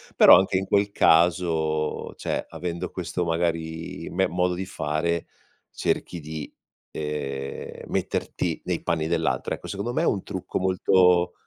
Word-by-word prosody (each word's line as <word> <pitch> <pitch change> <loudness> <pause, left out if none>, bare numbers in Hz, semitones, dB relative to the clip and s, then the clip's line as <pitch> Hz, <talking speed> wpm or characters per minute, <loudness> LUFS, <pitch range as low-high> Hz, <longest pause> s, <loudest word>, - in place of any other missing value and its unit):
Però, - - +9
anche 95 0 +1
in 95 0 -2
quel 100 0 +2
caso, 80 -3 +2
cioè, - - -3
avendo 90 0 -5
questo, 90 -1 -3
magari, 80 -1 -2
me 95 +2 +1
modo 90 +1 +1
di 95 +2 -3
fare 80 0 -1 0.4
cerchi 85 -2 -2
di, 75 -1 -6 0.4
ehm, 70 -3 -5
metterti - - -2
nei - - -2
panni 80 -1 0
dell'altro, 80 -6 0
ecco. - - -7
Secondo 100 +5 -3
me, 160 +6 0
un 100 - +1
trucco 95 -2 -4
molto 90 -1 +3
85 Hz, 135 wpm, -25 LUFS, 80-90 Hz, 0.4 s, Però